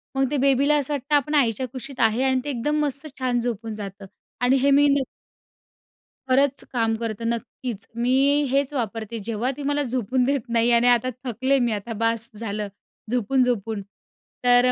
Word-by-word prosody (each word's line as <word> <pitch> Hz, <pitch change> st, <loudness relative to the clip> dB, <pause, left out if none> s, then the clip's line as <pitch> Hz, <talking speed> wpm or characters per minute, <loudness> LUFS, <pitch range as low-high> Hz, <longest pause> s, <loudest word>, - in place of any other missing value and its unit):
मग 270 Hz, -1 st, +1 dB
ते 295 Hz, -, +1 dB
बेबीला 275 Hz, +2 st, +3 dB
असं 290 Hz, 0 st, -1 dB
वाटतं 285 Hz, +1 st, 0 dB
आपण 290 Hz, +1 st, +1 dB
आईच्या 255 Hz, -2 st, +2 dB
कुशीत 260 Hz, +2 st, -9 dB
आहे 225 Hz, +2 st, +3 dB
आणि 260 Hz, -1 st, +2 dB
ते 290 Hz, -, -4 dB
एकदम 290 Hz, +4 st, -1 dB
मस्त 285 Hz, +2 st, -3 dB
छान 250 Hz, -2 st, +1 dB
झोपून 225 Hz, -2 st, -3 dB
जातं 195 Hz, -2 st, -8 dB, 0.4 s
आणि 250 Hz, +2 st, +4 dB
हे 280 Hz, +1 st, +4 dB
मी 285 Hz, +1 st, +5 dB
न -, -, 0 dB, 1.3 s
खरंच 275 Hz, +1 st, +2 dB
काम 225 Hz, -2 st, +1 dB
करतं 230 Hz, 0 st, -3 dB
नक्कीच. 235 Hz, -1 st, -5 dB
मी 240 Hz, +2 st, +1 dB, 0.4 s
हेच 275 Hz, +1 st, +1 dB
वापरते 225 Hz, -3 st, -3 dB
जेव्हा 230 Hz, +4 st, -1 dB
ती 290 Hz, -, -6 dB
मला 290 Hz, +1 st, 0 dB
झोपून 255 Hz, 0 st, 0 dB
देत 270 Hz, -1 st, -1 dB
नाही 235 Hz, 0 st, +2 dB
आणि 235 Hz, +1 st, +4 dB
आता 245 Hz, 0 st, +4 dB
थकले 260 Hz, +3 st, +1 dB
मी 240 Hz, -2 st, +1 dB
आता 215 Hz, +2 st, -4 dB
बास 230 Hz, 0 st, 0 dB
झालं 210 Hz, -1 st, -3 dB, 0.4 s
झोपून-झोपून 240 Hz, -3 st, 0 dB, 0.6 s
तर 245 Hz, 0 st, +6 dB
245 Hz, 170 wpm, -23 LUFS, 230-270 Hz, 1.3 s, तर